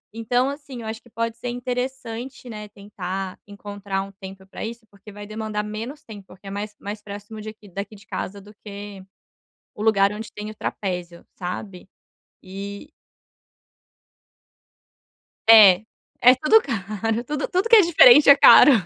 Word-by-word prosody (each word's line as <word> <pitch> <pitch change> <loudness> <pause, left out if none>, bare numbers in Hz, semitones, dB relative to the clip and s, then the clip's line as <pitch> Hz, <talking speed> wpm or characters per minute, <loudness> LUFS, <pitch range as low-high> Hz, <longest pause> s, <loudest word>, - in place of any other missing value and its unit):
Então 245 +4 0
assim, 280 -4 -8
eu 220 - -7
acho 220 +1 -6
que 240 - -21
pode 230 0 -3
ser 245 +1 -5
interessante, 250 0 -5
né, 210 -1 -8
tentar 195 -2 -6
encontrar 200 -1 -5
um 195 - -11
tempo 190 -1 -12
para 195 - -9
isso, 230 0 -7
porque 200 +1 -15
vai 205 0 -10
demandar 215 0 -4
menos 225 +8 -7
tempo, 205 -3 -12
porque 195 +1 -15
é - - -6
mais 205 +1 -6
mais 205 +1 -7
próximo 205 +1 -9
de 215 - -7
aqui 215 -1 -14
daqui 200 +3 -7
de 205 - -17
casa 200 +2 -5
do 205 +2 -15
que 200 -2 -9 0.7
o 210 - -9
lugar 200 -2 +3
onde 220 +1 -8
tem 210 +1 -7
o 215 - -10
trapézio, 180 -5 -5
sabe. 185 +1 -7 0.5
E 200 +7 -8 2.6
É. 210 -4 +8 0.4
É 250 +1 +9
tudo 305 - +4
caro. 220 0 -3
Tudo 295 +1 -3
tudo 370 +4 0
que 460 - +7
é 430 - +9
diferente 300 -5 +7
é 280 - +10
caro. 290 - +8
210 Hz, 160 wpm, -22 LUFS, 200-235 Hz, 2.6 s, é